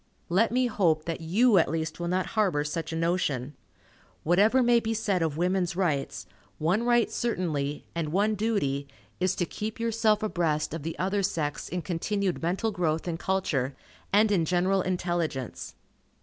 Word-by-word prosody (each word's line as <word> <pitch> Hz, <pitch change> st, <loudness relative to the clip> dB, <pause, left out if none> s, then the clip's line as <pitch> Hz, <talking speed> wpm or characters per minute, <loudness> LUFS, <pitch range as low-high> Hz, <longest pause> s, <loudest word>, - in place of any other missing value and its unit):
Let 205 Hz, +7 st, +3 dB
me 255 Hz, +1 st, +2 dB
hope 170 Hz, -9 st, +1 dB
that 165 Hz, -1 st, -3 dB
you 200 Hz, +6 st, +4 dB
at 160 Hz, -, +2 dB
least 160 Hz, +1 st, -3 dB
will 170 Hz, -, -2 dB
not 185 Hz, +1 st, 0 dB
harbor 190 Hz, -10 st, +2 dB
such 155 Hz, +2 st, -4 dB
a -, -, -3 dB
notion. 160 Hz, -6 st, 0 dB, 0.7 s
Whatever 210 Hz, +10 st, +4 dB
may 240 Hz, 0 st, +5 dB
be 225 Hz, 0 st, -2 dB
said 200 Hz, -5 st, 0 dB
of 155 Hz, -2 st, -1 dB
"women's 180 Hz, 0 st, 0 dB
rights," 145 Hz, -, -1 dB, 0.3 s
one 175 Hz, +8 st, +1 dB
right 240 Hz, -1 st, +2 dB
certainly, 155 Hz, -11 st, -2 dB
and 165 Hz, -3 st, -2 dB
one 205 Hz, +5 st, +2 dB
duty, 195 Hz, -11 st, -1 dB, 0.3 s
is 185 Hz, 0 st, +1 dB
to 175 Hz, -, 0 dB
keep 215 Hz, +5 st, -5 dB
yourself 225 Hz, -2 st, +2 dB
abreast 160 Hz, -7 st, 0 dB
of 165 Hz, -, -4 dB
the 165 Hz, +3 st, -5 dB
other 195 Hz, +2 st, 0 dB
sex 155 Hz, -6 st, -2 dB
in 180 Hz, -1 st, -3 dB
continued 185 Hz, +3 st, -1 dB
mental 185 Hz, +7 st, 0 dB
growth 165 Hz, -3 st, -1 dB
and 165 Hz, -1 st, -3 dB
culture, 150 Hz, -10 st, -1 dB, 0.4 s
and 210 Hz, +2 st, +4 dB
in 185 Hz, -5 st, +3 dB
general 185 Hz, +3 st, +2 dB
intelligence. 175 Hz, -8 st, -3 dB
180 Hz, 165 wpm, -27 LUFS, 160-210 Hz, 0.7 s, may